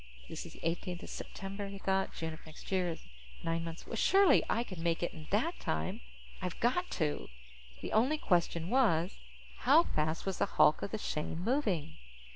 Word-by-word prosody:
This - - -6
is - - -12
the - - -10
eighteenth 175 +1 -3
of - - -8
September, 195 +1 -5
he 195 0 -7
thought, 195 0 0
June 160 -1 -3
of 155 - -11
next 155 - -11
year 185 -2 +2
is 165 - -6 0.4
nine 165 0 0
months 165 0 -7
away. 230 - -5
Surely 390 - +6
I 235 - +2
can 185 -8 -7
make 170 0 0
it 175 - -1
in 155 -2 -10
that 250 - +1
time. 80 +1 -2 0.4
I've 180 -2 -4
got 355 +10 +1
to. 150 -4 -1 0.5
The - - -4
only 255 +8 +4
question 170 - +1
was, 195 -9 +3 0.4
how 295 +7 +6
fast 155 - -1
was 195 -2 -2
the - - +3
hulk 150 - +6
of - - -2
the 220 - -2
Shane 155 -6 -3
moving? 185 - 0
180 Hz, 195 wpm, -33 LUFS, 165-220 Hz, 0.5 s, Surely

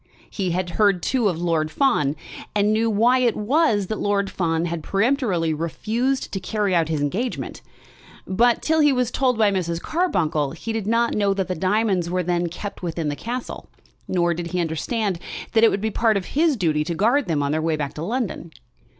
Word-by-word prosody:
He 190 -3 -2
had 175 0 -2
heard 200 -4 +3
too 245 -6 +2
of 170 -3 -3
Lord 165 -3 0
Fawn, 155 - +1 0.4
and 210 +1 +3
knew 225 +1 +2
why 235 +4 +3
it 240 -3 +2
was 220 -2 +2
that 215 +3 -4
Lord 200 -1 0
Fawn 165 -2 0
had 170 -1 -3
peremptorily 195 - +1
refused 225 - -2
to 195 - -3
carry 205 +1 -1
out 165 -2 +2
his 155 -3 -1
engagement. 205 - -3 0.6
But, 235 +5 +2
till 320 0 +2
he 295 -1 +5
was 250 -2 0
told 255 -3 +1
by 215 -2 +4
Mrs. 170 -3 -1
Carbuncle, 165 - 0
he 225 +7 -5
did 220 -3 -3
not 230 +1 +2
know 200 -2 +1
that 190 -2 -1
the 185 - -1
diamonds 185 0 +1
were 180 +1 0
then 175 0 0
kept 200 +4 -7
within 165 -3 -2
the 145 - -2
castle, 240 - -6 0.4
nor 175 -2 +1
did 170 0 -4
he 180 +1 -2
understand 175 +4 -1 0.3
that 225 -1 +3
it 225 - +8
would 195 - -2
be 220 0 -1
part 220 -1 +2
of 190 - -4
his 310 -1 +2
duty 155 -6 +1
to 170 0 -3
guard 235 - +2
them 150 -4 0
on 140 - 0
their 155 +1 0
way 160 0 0
back 145 -2 -4
to 150 - -7
London. 205 -4 -3
195 Hz, 205 wpm, -22 LUFS, 170-230 Hz, 0.6 s, it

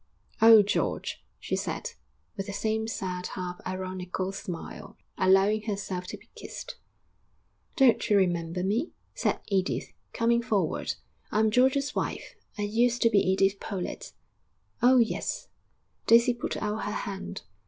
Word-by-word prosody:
'Oh, 225 -2 +9
George!' 205 - -2 0.2
she - - -2
said, - - -3 0.4
with 195 -1 -4
the 200 - -5
same 220 +2 -1
sad, 185 -4 -3
half 180 -1 -5
ironical 185 0 -3
smile, 190 -4 -7 0.2
allowing 195 +3 +4
herself 195 -3 -3
to - - -6
be - - -22
kissed. - - -8 1.0
'Don't 265 -7 +4
you 205 - +5
remember 175 -2 0
me?' 225 - 0 0.2
said - - -1
Edith, 190 -2 -1 0.2
coming 235 0 +2
forward. 205 -8 -1 0.4
'I'm 215 0 +3
George's 265 +4 +3
wife; - - -3 0.2
I 205 - -2
used 235 +4 +2
to 230 - +5
be 205 - +5
Edith 195 +1 +2
Pollett.' 190 -4 -5 0.7
'Oh, 255 +2 +6
yes!' 255 - 0 0.6
Daisy 235 +2 +6
put 240 - -4
out 210 0 -2
her 205 - -2
hand. 195 -1 -6
205 Hz, 135 wpm, -28 LUFS, 185-230 Hz, 1.0 s, Oh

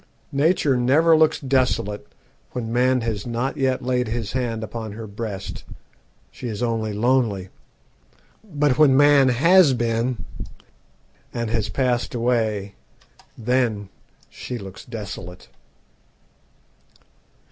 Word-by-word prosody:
Nature 145 -1 +2
never 145 +7 +4
looks 155 0 +3
desolate 120 -6 0 0.5
when 115 -2 -4
man 125 +1 +2
has 110 -2 -3
not 120 +3 -2
yet 130 -1 0
laid 125 -1 0
his 110 -2 -3
hand 120 -3 -2
upon 110 -1 -6
her 110 +1 -7
breast; 105 -1 -6 0.7
she 125 - -7
is 110 +1 -4
only 115 -2 -1
lonely. 105 -4 +1 0.9
But 150 - 0
when 140 -4 +6
man 145 -2 +6
has 160 +3 +5
been, 115 -3 -1 1.1
and 115 -2 -3
has 110 -3 -1
passed 125 0 -1
away, 110 -4 0 0.6
then 115 -4 0 0.4
she 125 - -7
looks 95 -3 -10
desolate. 100 -6 -8
120 Hz, 110 wpm, -22 LUFS, 110-130 Hz, 1.1 s, when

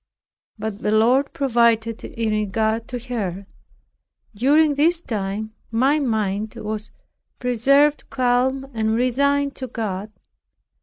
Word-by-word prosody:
But 215 -1 -5
the 210 - -1
Lord 245 +6 +3
provided 230 -4 +1
in 225 -1 -3
regard 220 +2 0
to 250 - -4
her. 200 -5 -3 0.9
During 290 +7 +3
this 325 +4 +3
time 215 - -4 0.2
my 265 +7 +2
mind 215 -5 -1
was 215 0 -5 0.5
preserved 275 +5 +2
calm 255 +1 +1
and 220 -1 0
resigned 280 +3 +1
to 260 - -5
God. 210 -3 -4
230 Hz, 110 wpm, -22 LUFS, 215-270 Hz, 0.9 s, Lord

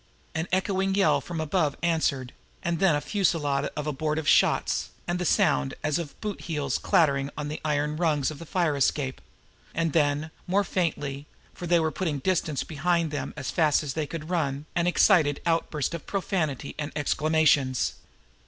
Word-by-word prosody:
An 160 +2 -2
echoing 190 +1 +1
yell 155 -8 +3
from 170 +3 -5
above 155 -2 0
answered 145 -7 0 0.3
and 170 -1 -1
then 190 -6 +4
a 145 - -1
fusillade 145 -9 0
of 150 - -3
abortive 155 +1 -2
shots, - - +3 0.2
and 175 0 -1
the 180 - -1
sound 70 - +2
as 150 +2 +1
of 160 -4 -7
boot 210 -2 -4
heels 145 -5 -2
clattering 140 -4 +2
on 150 0 -3
the 150 - -5
iron 150 0 0
rungs 155 -5 +1
of 150 - -9
the 165 - -9
fire 170 -5 +1
escape; 135 -1 0 0.5
and 165 -2 0
then, 150 0 +1 0.2
more 195 +3 +2
faintly, 150 -6 -2 0.3
for 175 - -7
they 170 0 +4
were 160 -1 0
putting 160 -5 -2
distance 155 -2 0
behind 170 +1 0
them 145 -2 -3
as 135 -3 -3
fast 155 -4 +3
as 140 -3 -3
they 155 -1 -2
could 165 +1 -6
run, 145 -4 -1
an 170 0 +2
excited 165 -5 +4
outburst 165 -4 0
of 170 - -6
profanity 160 -8 -2
and 150 -1 -3
exclamations. 150 -3 +2
155 Hz, 170 wpm, -27 LUFS, 145-170 Hz, 0.5 s, then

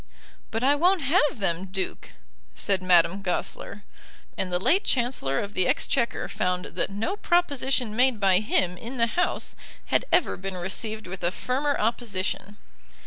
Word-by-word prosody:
"But 225 +2 -3
I 275 +2 +5
won't 350 +5 +3
have 295 0 +2
them, 190 -3 0
Duke," 190 0 -5 0.4
said 190 - 0
Madame 180 +1 +4
Goesler; 195 +2 -4 0.5
and 185 - -2
the 180 - +2
late 340 - +3
Chancellor 235 - 0
of 205 0 -5
the 185 - +2
Exchequer 240 -4 0
found 180 0 -1
that - - -2
no 215 - -2
proposition 275 - 0
made 250 -1 +3
by 190 -2 +4
him 185 -4 +1
in 245 +3 -7
the 230 - +4
House 350 +10 -1 0.4
had - - +3
ever - - +3
been 190 0 -5
received 215 +4 -4
with 185 0 -7
a 175 - +3
firmer 275 +7 -1
opposition. 205 -3 -2
210 Hz, 155 wpm, -26 LUFS, 185-260 Hz, 0.5 s, I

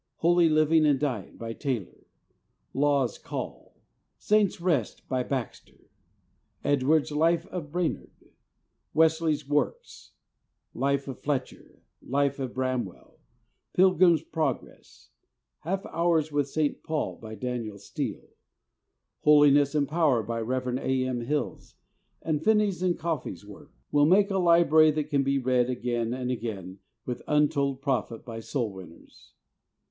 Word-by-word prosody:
"Holy 170 0 +3
Living 155 +1 +4
and 145 -3 +3
Dying," 125 -10 -3
by 115 0 -5
Taylor; 125 - -5 0.7
"Law's 140 -4 +1
Call," - - -7 0.4
"Saint's 210 -3 +2
Rest," 165 - -1
by 130 -1 0
Baxter; 125 -2 -6 0.7
Edwards' 145 +2 +2
"Life 165 +3 +2
of 165 -5 -6
Brainerd," 175 0 -4 0.6
Wesley's 160 -2 +2
works, 150 - -2 0.6
"Life 140 0 0
of 135 - -6
Fletcher," 140 -3 -4 0.2
"Life 140 +1 0
of 130 -2 -3
Bram 130 -1 0
well," 90 - -14 0.5
"Pilgrim's 180 -3 +4
Progress," 160 - -5 0.5
"Half 190 +4 -3
Hours 165 -2 +1
with 145 -1 0
St. 150 0 -1
Paul," 155 -2 -3
by 110 -1 -9
Daniel 115 -2 -4
Steele; - - -5 0.9
"Holi 150 -1 +6
ness 145 +1 +3
and 145 -2 +2
Power," 150 -7 +2
by 115 +2 -3
Rev. 125 +2 -2
A. 130 -1 0
M. 125 -2 -2
Hills, 145 +5 -3 0.5
and 155 -1 -1
Finney's 210 -4 +2
and 180 -2 +1
Caughey's 150 - -4
works 100 -1 -13 0.2
will 145 0 +4
make 200 +4 +4
a 195 - +1
library 170 -3 +5
that 150 0 -2
can 140 -1 +3
be 140 0 +1
read 125 -1 +1
again 120 -2 -2
and 125 0 -2
again 100 -6 -5 0.3
with 125 -1 -4
untold 145 -2 +1
profit 130 -5 -2
by 115 -2 -6
soul 115 -2 -3
winners. 95 -3 -14
145 Hz, 130 wpm, -27 LUFS, 125-160 Hz, 0.9 s, Holi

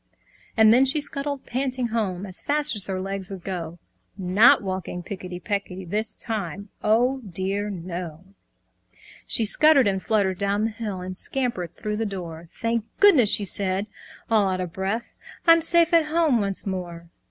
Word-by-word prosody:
And 220 0 +6
then 255 +3 +5
she 270 +3 +3
scuttled 285 -1 -3
panting 255 -1 -2
home 205 -5 -2
As 185 -2 -6
fast 295 -2 +2
as 205 -2 +2
her 190 -1 -3
legs 195 0 -5
would 190 -3 -8
go, 175 -3 -5 0.4
Not 195 +5 +4
walking 185 -2 -5
picketty 180 -1 -7
pecketty 190 -2 -4
This 210 +5 -3
time, 200 -3 -5
oh 245 +5 +2
dear 195 -1 -3
no! 175 -3 -7 1.0
She 225 - +1
scuttered 285 +4 +5
and 190 -1 0
fluttered 195 -4 0
down 200 +1 0
the 225 - -1
hill, 210 -4 -5
And 185 0 -6
scampered 190 -9 -3
through 210 -1 -4
her 225 - -1
door. 170 -5 -7
"Thank 230 -1 -2 0.2
goodness!" 310 - +6
she 205 - +3
said, 195 +1 0 0.4
all 215 -4 +2
out 185 -1 -2
of 180 -3 -5
breath, 195 +5 -3 0.3
"I'm 330 -1 +6
safe 340 +1 +5
at 330 -2 +5
home 305 -6 +2
once 195 -1 -1
more!" 175 -3 -6
200 Hz, 165 wpm, -24 LUFS, 185-240 Hz, 1.0 s, And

